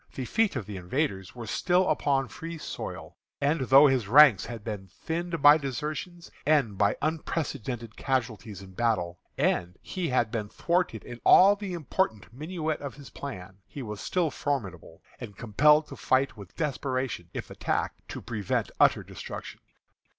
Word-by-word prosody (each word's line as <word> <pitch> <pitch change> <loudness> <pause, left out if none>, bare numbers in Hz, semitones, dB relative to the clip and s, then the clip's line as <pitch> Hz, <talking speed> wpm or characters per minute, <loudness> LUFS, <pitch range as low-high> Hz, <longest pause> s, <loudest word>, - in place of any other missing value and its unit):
The 130 - -3
feet 220 - +1
of 125 -6 -3
the 105 -2 -7
invaders 95 - -2
were 120 -2 -7
still 180 +11 +2
upon 135 -2 +1
free 165 +3 -7
soil; - - -7 0.2
and 145 +2 +1
though 135 +3 +7
his 130 -7 +2
ranks 130 -2 +7
had 115 -3 -7
been 105 -4 -5
thinned 165 - -4
by 145 +2 +9
desertions, 155 +6 -5
and 140 -9 +2
by 100 +1 +2
unprecedented 140 -7 -3
casualties 110 -6 -2
in 95 - -12
battle, 95 -5 -1 0.2
and 90 +1 0
he 180 -4 -3
had 120 -3 +1
been 105 -3 -3
thwarted 170 - -1
in 120 -1 -9
all 200 +2 +7
the 200 -2 -6
important 155 - -2
minutiæ 155 +1 -3
of 140 -2 -7
his 140 -1 -12
plan, 95 -8 -8
he 140 - -7
was 105 -2 -6
still 175 -5 0
formidable, 110 - -4 0.2
and 100 - -9
compelled 150 +8 +4
to - - -8
fight 130 +1 +1
with 100 -4 -12
desperation, 130 - -2
if - - -5
attacked, - - -2
to - - -7
prevent 110 -5 -2
utter - - +4
destruction. - - -8
130 Hz, 160 wpm, -28 LUFS, 105-155 Hz, 0.2 s, by